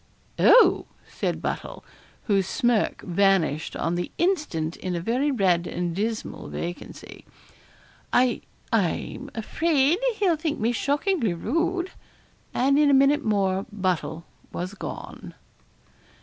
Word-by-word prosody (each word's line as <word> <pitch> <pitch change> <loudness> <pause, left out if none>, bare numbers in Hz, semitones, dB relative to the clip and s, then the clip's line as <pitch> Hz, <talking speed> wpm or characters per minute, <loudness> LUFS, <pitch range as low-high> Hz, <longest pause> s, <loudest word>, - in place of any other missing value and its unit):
'Oh!' - - +6 0.2
said - - -3
Buttle, - - -4 0.4
whose 195 -4 +1
smirk 240 -2 +1
vanished 175 -5 +1
on 165 - -1
the 175 0 -2
instant 295 - 0
in 180 -1 -3
a - - -1
very 245 +11 0
red 185 -9 +2
and 175 -1 -3
dismal 220 +3 -3
vacancy, 175 +1 -7 0.9
'I 245 -1 +3 0.3
I'm 225 - -1
afraid 300 - +1 0.2
he'll 375 -6 +2
think 310 -1 -2
me 225 +2 +1
shockingly 285 - 0
rude.' 345 - -1 0.6
And 275 +3 +2
in 295 -1 +5
a 280 - +5
minute 280 +2 +4
more 195 -1 0
Buttle 180 -4 -2 0.3
was 180 +3 -4
gone. 205 - -8
225 Hz, 120 wpm, -25 LUFS, 180-290 Hz, 0.9 s, Oh